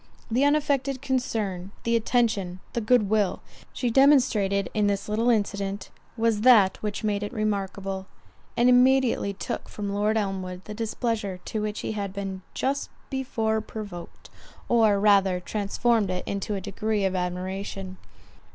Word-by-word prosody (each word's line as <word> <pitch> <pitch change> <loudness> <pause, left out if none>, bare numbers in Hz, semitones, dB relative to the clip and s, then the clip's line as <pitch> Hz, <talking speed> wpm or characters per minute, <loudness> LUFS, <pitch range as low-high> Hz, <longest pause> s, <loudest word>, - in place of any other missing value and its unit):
The 250 +5 +3
unaffected 285 -2 +1
concern, 220 -9 -2
the 230 0 +1
attention, 220 -6 +1
the 235 - -1
good 220 -1 +3
will, 210 -2 +1 0.3
she 245 -2 -1
demonstrated 225 -8 +4
in 210 -1 +2
this 200 -1 -1
little 220 +3 +1
incident, 200 -3 -1 0.3
was 225 -2 +1
that 220 -6 +6
which 210 0 -3
made 205 -1 0
it 205 - -4
remarkable, 195 -3 -3 0.5
and 240 - +4
immediately 250 -3 +4
took 200 - -5
from 205 -1 -4
Lord 210 +2 +1
Elmwood 190 -3 -3
the 210 - -7
displeasure 220 -3 -2
to 215 - -3
which 210 0 -3
he - - -3
had 200 -3 -4
been 195 -1 -5
just 275 +2 -1 0.2
before 225 -5 -1
provoked, 205 -5 -9 0.4
or 220 -4 +4
rather 195 -3 +4
transformed 210 +2 0
it 180 0 -2
into 200 +1 -3
a 195 - -4
degree 210 +2 -1
of 190 0 0
admiration. 185 +1 -4
210 Hz, 145 wpm, -26 LUFS, 195-230 Hz, 0.5 s, that